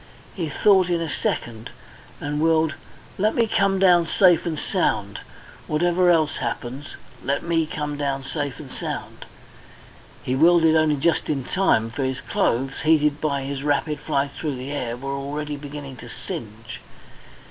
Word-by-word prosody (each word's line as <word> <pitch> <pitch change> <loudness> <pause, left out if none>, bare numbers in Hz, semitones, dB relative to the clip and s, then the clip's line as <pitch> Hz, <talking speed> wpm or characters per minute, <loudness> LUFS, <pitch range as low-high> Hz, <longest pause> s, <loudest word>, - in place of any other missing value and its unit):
He 170 -5 -3
thought 190 +3 +4
in 175 -1 +1
a 165 - -2
second, 115 -6 -3 0.5
and 145 +1 -2
willed. 160 -1 +3 0.5
"Let 215 +3 +2
me 235 - +3
come 195 -3 +2
down 175 -3 +5
safe 175 -3 +4
and 160 -2 -2
sound. 110 - -1 0.5
Whatever 175 +3 +2
else 155 -3 +3
happens, 130 +4 -5 0.3
let 140 +2 -1
me 165 -2 +1
down 145 -3 -3
safe 145 -1 -4
and - - -10
sound." - - -6 1.0
He 130 - -1
willed 165 +3 +5
it 160 0 +5
only 155 -1 +3
just 165 +4 +1
in 140 -4 -1
time, 115 -10 +1
for 135 +4 -3
his 130 0 -2
clothes, 135 +3 -1
heated 150 -2 +3
by 140 -3 0
his 135 0 -4
rapid 150 +1 0
flight 140 -2 -1
through 150 -2 -4
the 130 +2 -6
air, 120 -5 -3
were 135 +2 -4
already 145 +2 -4
beginning 140 -2 -8
to 120 0 -10
singe. 115 -1 -7
150 Hz, 160 wpm, -23 LUFS, 135-165 Hz, 1.0 s, down